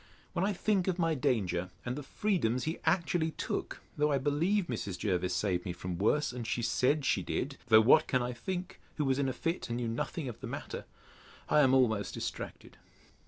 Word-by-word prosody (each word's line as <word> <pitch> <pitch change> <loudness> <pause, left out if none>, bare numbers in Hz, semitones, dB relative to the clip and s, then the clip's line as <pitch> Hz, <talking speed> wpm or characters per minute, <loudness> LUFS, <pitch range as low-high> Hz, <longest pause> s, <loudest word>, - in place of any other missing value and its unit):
When 175 - 0
I 200 - +2
think 195 -1 +1
of 185 -2 +1
my 165 -2 +2
danger, 95 - 0 0.2
and 125 +1 -2
the 145 - -4
freedoms 135 - 0
he 160 +2 -2
actually 165 -1 +2
took, 160 - -4
though 150 0 +2
I 140 - +3
believe 160 +9 +1
Mrs. 105 - -4
Jervis 90 -3 0
saved 90 -4 0
me 90 - -3
from 90 0 -5
worse, 135 +9 +2
and 120 -2 -5
she 120 - -1
said 130 +5 +2
she - - +2
did, 140 +1 -3
(though 110 -2 +8
what 135 +8 +6
can 130 -2 +1
I 125 0 -2
think, 180 +9 -5 0.2
who 150 - +1
was 135 0 +1
in 135 -1 +1
a - - -2
fit, 165 +6 -2
and 120 - -1
knew 120 -1 -2
nothing 130 +6 -3
of 120 - -6
the - - -6
matter?) - - -6 0.6
I - - +5
am 135 -2 +5
almost 110 -7 +2
distracted. - - -6
130 Hz, 210 wpm, -31 LUFS, 115-160 Hz, 0.6 s, though